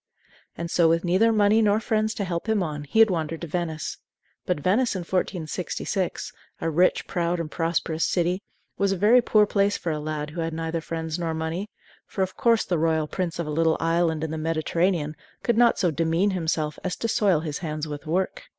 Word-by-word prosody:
And 170 0 -4
so, 170 -2 +4
with 165 +1 +2
neither 190 +6 +4
money 215 0 +4
nor 210 0 +3
friends 220 0 0
to 200 - -2
help 175 +3 -3
him 215 -4 +2
on, 150 -3 -4
he 145 - -4
had 225 -2 +7
wandered 165 -2 -2
to - - -3
Venice. 160 -2 -3 0.5
But 180 -4 0
Venice 210 - +2
in 185 - -2
1466, 180 +1 -2 0.3
a 165 - -1
rich, 180 +4 +3
proud, 175 0 -1
and 165 -2 -4
prosperous 165 -1 -1
city, 180 +1 +1 0.4
was 200 0 +2
a 195 - 0
very 220 +7 +5
poor 215 -2 +4
place 200 0 +1
for 165 - -3
a 155 - -2
lad 150 0 -4
who 170 +2 -4
had 165 0 -2
neither 165 0 -2
friends 160 0 -4
nor 165 -2 -2
money; 160 +6 -3 0.4
for, 190 - -1
of 185 0 -4
course, 230 -2 +3
the 175 -3 0
royal 160 -1 +1
prince 175 -1 -3
of 170 - -2
a 150 - -4
little 160 +1 +2
island 165 -1 +1
in 160 - -3
the 160 - -3
Mediterranean 165 0 0 0.3
could 235 - +2
not 235 0 +4
so 175 - +2
demean 165 +6 +1
himself 160 -4 -1
as 185 -1 -2
to 230 - -2
soil 195 -7 +2
his 150 -3 -4
hands 155 -2 -4
with 150 +1 -7
work! 185 +4 -1
170 Hz, 210 wpm, -25 LUFS, 160-195 Hz, 0.5 s, had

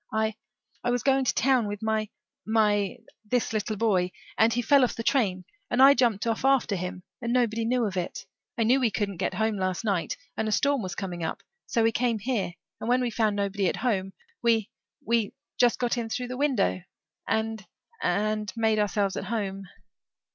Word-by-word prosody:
I 220 0 0 0.5
I 245 - 0
was 245 -1 0
going 270 -1 +3
to - - +2
town 255 -3 +3
with 205 +1 -5
my 220 -1 0 0.3
my 210 -3 +2 0.3
this 230 +2 -1
little 215 0 -1
boy 190 -4 +1 0.2
and 220 +1 +4
he 245 +1 0
fell 275 +3 +5
off 250 - +1
the 230 - -4
train 195 -9 +1 0.2
and 245 - 0
I 270 +1 +9
jumped 235 -6 +1
off 230 0 -1
after 270 -6 +3
him 180 0 -5 0.2
and 235 - -2
nobody 230 -2 +1
knew 245 0 +1
of 195 -3 -3
it. 180 -2 -4 0.3
I 230 - +2
knew 250 +5 +4
we 245 -3 +3
couldn't 200 -3 -2
get 185 - -1
home 220 +1 0
last 185 +2 -1
night 195 -6 -1 0.2
and 220 - -1
a - - -1
storm 280 +3 +2
was 185 -3 -5
coming 175 -4 -4
up - - -4 0.2
so 230 - +1
we 225 - +4
came 235 0 +1
here 215 -5 -2 0.3
and 225 - -4
when 250 +1 +3
we 245 -2 -1
found 215 -2 +1
nobody 200 -1 0
at - - 0
home 195 -6 -1 0.3
we 225 -3 +2 0.3
we 230 -2 +1 0.2
just 245 -1 +4
got 245 0 0
in 225 -1 -4
through 250 +2 -3
the 255 - -4
window 255 -9 +1 0.5
and 220 -1 -1 0.4
and 215 -1 0
made 220 -1 +2
ourselves 205 -1 +1
at - - -4
home." 195 -3 -3
220 Hz, 200 wpm, -27 LUFS, 200-240 Hz, 0.5 s, I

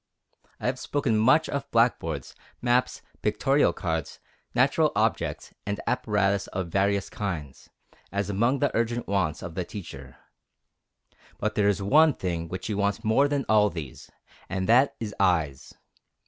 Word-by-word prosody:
I - - -7
have 125 +1 0
spoken 140 -6 0
much 130 +9 +4
of 140 -1 -4
blackboards, 80 - +1 0.3
maps, 125 +1 +1 0.2
pictorial 135 +7 +2
cards, 80 -4 -3 0.4
natural - - +3
objects, - - -1
and 100 0 -3
apparatus 100 -5 +1
of 95 -2 -4
various 100 +2 +1
kinds, 80 -10 -5 0.4
as 100 0 -1
among 115 +7 +1
the 145 -1 0
urgent 115 +1 -1
wants 95 -6 -1
of 85 -3 -6
the 90 - -2
teacher. 70 -9 -9 1.2
But 110 +1 -1
there 100 0 +2
is 100 -1 +1
one 155 +8 +5
thing 85 -3 -3
which 95 +3 -6
he 110 - -2
wants 100 +2 -1
more 115 +6 +3
than 145 -2 -1
all 105 -1 +4
these, 80 -7 -8 0.4
and 95 0 -2
that 125 +5 +4
is 105 -2 -4
EYES. 80 -8 0
100 Hz, 145 wpm, -26 LUFS, 90-120 Hz, 1.2 s, one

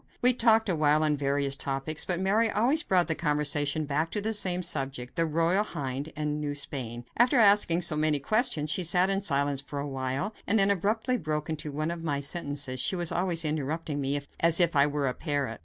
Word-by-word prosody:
We 250 +1 +8
talked 225 -2 +3
awhile 155 -3 +2
on 150 -1 +1
various 140 -1 0
topics, 140 +3 -1
but 180 -2 -2
Mary 210 +4 +2
always 250 +10 +2
brought 180 - +1
the 160 - -1
conversation 150 -1 +1
back 150 +3 -1
to 210 - -2
the 220 +2 -2
same 185 -3 +1
subject, 135 -6 -4
the 165 -1 0
Royal 165 +5 +1
Hind 140 -4 -5
and 150 0 -3
New 145 -1 -3
Spain. 120 -5 -6
After 245 +3 +3
asking 200 -5 +4
many 155 -1 +2
questions, 215 - 0
she 185 - +1
sat 180 +3 +2
in 195 0 0
silence 140 -6 0
for 140 0 -7
a - - -3
time, 135 +7 -3 0.2
and 220 - +2
then 200 -1 +4
abruptly 220 +6 -1
broke 155 -1 -4
into 155 -1 -5
one 155 +3 -3
of 170 -1 -6
my 145 -3 -2
sentences 140 -3 0
she 190 - 0
was 175 -2 -2
always 175 -3 -1
interrupting 150 0 -3
me 140 +1 0 0.2
as 170 +1 +3
if 170 -3 +3
I 140 0 +4
were 145 -1 -2
a 125 - -1
parrot. 140 -8 -3
155 Hz, 205 wpm, -27 LUFS, 145-185 Hz, 0.2 s, We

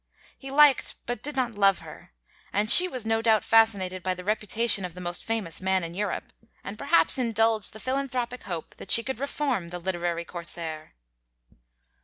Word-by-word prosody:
He 270 - -11
liked 285 -1 +4
but 245 0 -5
did 295 0 -4
not 250 -3 -2
love 195 -2 +2
her; - - -14 0.4
and 210 +2 +3
she 360 +7 +9
was 255 -9 -4
no 225 0 0
doubt 225 -2 +2
fascinated 200 -5 +2
by 185 +1 -2
the 180 - -10
reputation 210 +1 0
of 180 -2 -7
the - - -9
most 175 -1 -2
famous 220 -8 -4
man 190 -1 0
in 165 0 -7
Europe, 200 +1 -5 0.3
and 200 - -7
perhaps 285 +3 +3
indulged 225 -3 0
the 215 - -11
philanthropic 255 -1 -3
hope 170 -4 -8
that - - -12
she 230 - +7
could 265 -2 -5
reform 275 -8 -3
the 175 +1 -7
literary 175 -1 -3
Corsair. 165 -3 -5
215 Hz, 180 wpm, -25 LUFS, 180-245 Hz, 0.4 s, she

